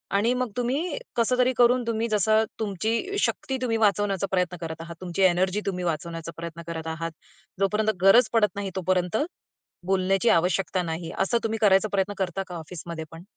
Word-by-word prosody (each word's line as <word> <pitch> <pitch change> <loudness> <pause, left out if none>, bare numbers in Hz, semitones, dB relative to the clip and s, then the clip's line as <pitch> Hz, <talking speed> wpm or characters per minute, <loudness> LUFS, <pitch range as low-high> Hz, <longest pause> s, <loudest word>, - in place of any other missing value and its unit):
आणि 225 +5 +3
मग 250 -2 -2
तुम्ही 275 - -1 0.2
कसं 240 +2 +2
तरी 255 +1 +3
करून 245 +1 +5
तुम्ही 230 0 0
जसं 215 +1 +3 0.2
तुमची 225 - -1
शक्ती 265 -9 -1
तुम्ही 230 -3 0
वाचवण्याचा 200 -2 +1
प्रयत्न 180 -1 0
करत 160 0 -5
आहात, 170 0 -8
तुमची 180 +1 -3
एनर्जी 185 +3 +3
तुम्ही 180 -2 -2
वाचवण्याचा 165 0 -3
प्रयत्न 170 0 -7
करत 165 -1 -5
आहात. 165 +1 -3 0.5
जोपर्यंत 210 +2 +1
गरज 215 +5 +6
पडत 210 -5 +3
नाही, 200 -1 -3
तोपर्यंत 185 +1 0 0.7
बोलण्याची 195 +3 +2
आवश्यकता 180 +2 +2
नाही, 165 0 -4
असं 235 +5 +2
तुम्ही 225 0 -1
करायचा 200 0 +5
प्रयत्न 195 0 0
करता 190 0 -2
का 175 - -6
ऑफिसमध्ये 165 0 -7
पण? 165 +1 -10
195 Hz, 170 wpm, -26 LUFS, 175-225 Hz, 0.7 s, गरज